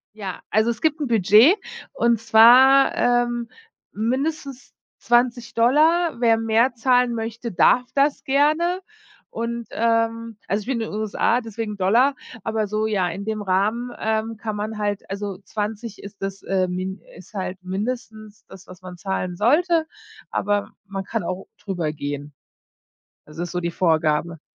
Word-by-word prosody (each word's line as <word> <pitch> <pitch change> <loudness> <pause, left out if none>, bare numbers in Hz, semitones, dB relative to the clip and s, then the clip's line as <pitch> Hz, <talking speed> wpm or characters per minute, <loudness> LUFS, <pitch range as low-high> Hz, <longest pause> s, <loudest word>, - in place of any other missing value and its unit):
Ja, 195 -4 -6
also 220 +2 +2
es 225 - -5
gibt 310 -1 +1
'n 290 - -1
Budget 220 - +6 0.4
und 235 -2 +2
zwar, 245 +5 +6
ähm, 240 -1 +1 0.4
mindestens 270 +4 -3 0.2
20$. 250 +6 +2
Wer 230 -2 +4
mehr 225 +3 +2
zahlen 245 0 +2
möchte, 230 +1 -5
darf 250 +6 +3
das 280 +1 +2
gerne 310 +7 +1 0.5
und, 235 0 -4
ähm 230 -1 0
also 205 +2 0
ich 205 - -12
bin 255 -3 -1
in - - -5
den - - -7
USA, 220 +3 +1
deswegen 220 -2 -6
Dollar, 240 +9 +3 0.3
aber 220 -1 -1
so 215 +1 -1
ja, 190 -5 0
in 195 +4 -6
dem 215 -1 -3
Rahmen, 210 +6 0
ähm, 220 +1 -1
kann 215 -1 -5
man 215 +1 -4
halt 205 -1 -3
Also 200 -1 -4
20 215 +1 -5
ist 200 0 -11
das, 195 0 -5
äh 185 -1 0
Min 185 +2 -4 0.2
ist 180 +3 -15
halt 190 -2 -4
mindestens 215 +2 -5
das, 190 0 -14
was 185 0 -14
man 180 -1 -10
zahlen 185 -2 -3
sollte, 320 - +2 0.4
aber 205 0 -1
man 195 -1 -5
kann - - -3
auch 185 +2 -5
drüber 175 -6 -3
gehen. 145 -1 -6 0.9
Also 155 +2 -10
das 175 - -3
ist - - -9
so 180 - -2
die 170 0 -2
Vorgabe. 160 -1 0
220 Hz, 155 wpm, -22 LUFS, 195-240 Hz, 0.9 s, Budget